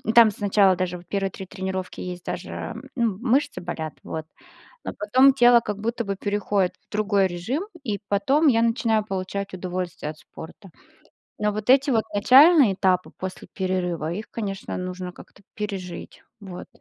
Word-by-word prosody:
там, 230 -2 +8
сначала 200 -1 +3
даже, 180 -1 -2
вот, 175 - -16
первые 195 -1 -1
3 190 +1 -9
тренировки 190 -1 -5
есть 180 -1 -6
даже, 185 +5 -5 0.2
ну, 230 -6 0
мышцы 270 +4 +1
болят, 160 -3 -5
вот. 160 -1 -5 0.6
Но - - -5
потом 255 +6 +5
тело 245 -2 +6
как 210 -3 -5
будто 235 +2 -2
бы 200 0 -2
переходит 200 -2 0
в - - -61
другой 205 -2 +2
режим, 230 - -3 0.2
и 210 -6 -2
потом 270 +11 +3
я 230 -4 +4
начинаю 225 -2 +1
получать 195 0 -4
удовольствие 180 -4 -4
от 155 - -14
спорта. 190 +3 -12 0.7
Но 210 0 +1
вот 215 +2 -5
эти 275 +2 +5
вот 225 -3 +2
начальные 265 - +7
этапы 185 -1 +1
после 190 0 -6
перерыва, 180 -4 -2
их 210 +4 -6
конечно 195 -4 -4
нужно 180 0 -5
как-то - - -16
пережить. 195 -4 -6 0.2
Вот. 185 -3 -9
200 Hz, 160 wpm, -24 LUFS, 185-230 Hz, 0.7 s, там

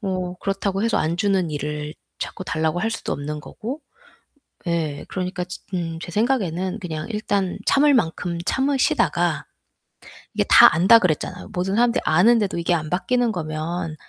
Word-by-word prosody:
뭐 185 -3 -3
그렇다고 195 0 -1
해서 230 +1 +1
안 160 +2 0
주는 190 -3 +1
일을 150 +1 -4 0.2
자꾸 185 - -5
달라고 160 0 -1
할 225 - 0
수도 - - -3
없는 150 +1 -4
거고. 245 - -7 0.9
예. 160 -4 -2
그러니까 185 -1 -3
지 180 +1 -8
음 165 -2 -3
제 175 - -7
생각에는 195 -4 0
그냥 160 -5 -5
일단 200 -4 -1
참을 290 +1 +4
만큼 170 -5 0
참으시다가 265 - +1 0.9
이게 - - +1
다 - - +9
안다 190 +8 +7
그랬잖아요. 180 0 -2
모든 185 +2 -1
사람들이 240 +2 +2
아는데도 205 +4 +3
이게 170 +1 0
안 155 -3 -1
바뀌는 240 +7 +1
거면 165 -1 -4
180 Hz, 330 characters per minute, -22 LUFS, 165-210 Hz, 0.9 s, 다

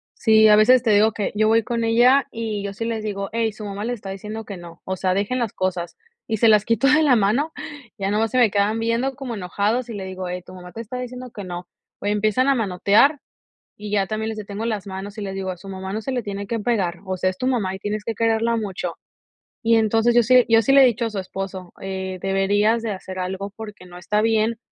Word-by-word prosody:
Sí, 220 -1 +5
a 210 - +7
veces 240 +4 +6
te 225 - +2
digo 210 +2 +5
que 210 -1 -3
yo 215 +1 +3
voy 225 +1 +4
con 235 +1 -2
ella, 245 +4 +4
y 220 -3 -4
yo 200 0 -4
sí 225 +3 -4
les 225 -2 -3
digo: 200 -2 -3
"Hey, 225 -1 0
su 215 0 -8
mamá 200 +1 -5
le 245 - -1
está 200 -4 -7
diciendo 210 +3 -6
que 200 -2 -7
no, 170 -1 -12
o 190 - -2
sea, 185 0 0
dejen 205 +6 -1
las 235 -4 -2
cosas", 180 -2 -2 0.3
y 220 - -1
se 230 - +4
las 215 -1 +5
quito 230 +4 +2
de 300 +2 +5
la 275 -4 +5
mano, 235 +9 +1 0.5
ya 195 -2 -2
nomás 215 +2 +1
se 255 - 0
me 235 -3 +5
quedan 205 +2 +1
viendo 230 +4 0
como 260 -3 -5
enojados, 210 +6 -1
y 230 - -5
le 195 -2 -5
digo: 185 -1 -6
"Hey, 180 0 -4
tu 185 - -12
mamá 180 -1 -11
te 225 - -7
está 235 +3 -7
diciendo 250 0 -7
que 205 - -8
no". 175 -1 -7 0.3
O - - -8
empiezan 215 +5 +1
a 275 - +4
manotear, 220 - +3 0.6
y 210 0 -8
ya 200 -2 +1
también 220 +1 -3
les 220 - -6
detengo 205 +1 -5
las 215 -4 -2
manos, 195 +2 -7
y - - -4
les 195 -1 -4
digo: 190 -1 -3
"A 180 - -5
su 195 - -12
mamá 190 0 -6
no 215 - -2
se 265 +5 -4
le 250 -2 -1
tiene 200 -1 -5
que 230 +3 -2
pegar, 195 -7 -1
o 190 -1 -3
sea, 185 - +1
es 185 - -3
tu 255 - -2
mamá 220 -8 0
y - - -6
tienes 210 +2 -3
que 230 - -3
quererla 230 +1 +1
mucho". 190 -5 -4 0.7
Y 230 0 +4
entonces 225 +1 +3
yo 240 - +6
sí 250 +2 +5
yo 225 0 +6
sí 270 - +1
le 275 0 +8
he - - +8
dicho 235 -1 +1
a - - -1
su 210 -3 -4
esposo, 190 -1 -6
eh: 190 -1 -4
"Deberías 205 +4 +2
de 225 - -3
hacer 185 -1 -7
algo, 190 +2 -4
porque 210 -4 -9
no 175 0 -12
está 210 +4 0
bien 225 0 +1
215 Hz, 260 wpm, -22 LUFS, 195-230 Hz, 0.7 s, le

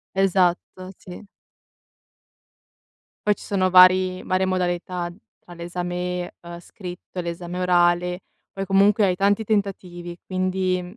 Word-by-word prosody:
Esatto, 185 0 0
sì. 185 +3 -12 2.0
Poi 210 - +4
ci - - -14
sono 185 -2 0
vari 185 0 +6
varie 185 0 0
modalità 180 -1 -2 0.3
tra 175 - -14
l'esame, 175 +1 -4
uhm, 170 0 -9
scritto 180 0 -10
e - - -1
l'esame 170 +1 -5
orale, 180 0 +2 0.3
poi 195 0 -5
comunque 200 +2 +4
hai 180 -1 0
tanti 200 +3 +2
tentativi 185 -4 -3
quindi 185 -1 -1
185 Hz, 115 wpm, -23 LUFS, 175-190 Hz, 2.0 s, vari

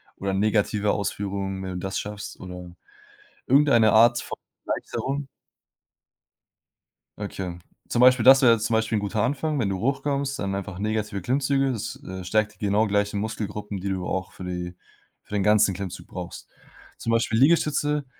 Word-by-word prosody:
oder 95 0 -3
negativer 105 0 +1
Ausführung, 100 -1 -3
wenn 95 0 -5
du - - -4
das 95 +1 -3
schaffst, 105 -1 -7
oder 90 -1 -9 0.7
irgendeine 125 -6 +5
Art 120 +2 +6
von - - -7 0.3
Erleichterung. 140 +1 -3 1.9
Okay. 95 -4 -5 0.3
Zum 120 - 0
Beispiel 125 -2 +6
das 135 +2 +8
wäre 120 -3 +7
jetzt 110 -1 -1
zum 115 - -1
Beispiel 110 0 +1
ein 105 - -1
guter 105 +1 -1
Anfang, 145 +3 -1
wenn 105 - +1
du 95 -1 -2
hochkommst, 140 +2 -1
dann 95 -1 -2
einfach 95 -1 -5
negative 105 -2 -2
Klimmzüge, 135 +3 +1
das, 110 - -5
äh, 95 0 -6
stärkt 110 +3 +1
die 105 - -5
genau 105 +2 +2
gleichen 100 0 0
Muskelgruppen, 105 -2 -4
die 100 - -3
du 95 -2 -2
auch 95 -1 -3
für 90 - -9
die 90 0 -5 0.5
für - - -13
den 100 -2 +1
ganzen 105 -2 +4
Klimmzug 95 -1 -7
brauchst. 90 -2 -8 0.5
Zum 115 - -3
Beispiel 115 -1 +1
Liegestütze, 150 -1 +2
105 Hz, 165 wpm, -25 LUFS, 95-125 Hz, 1.9 s, das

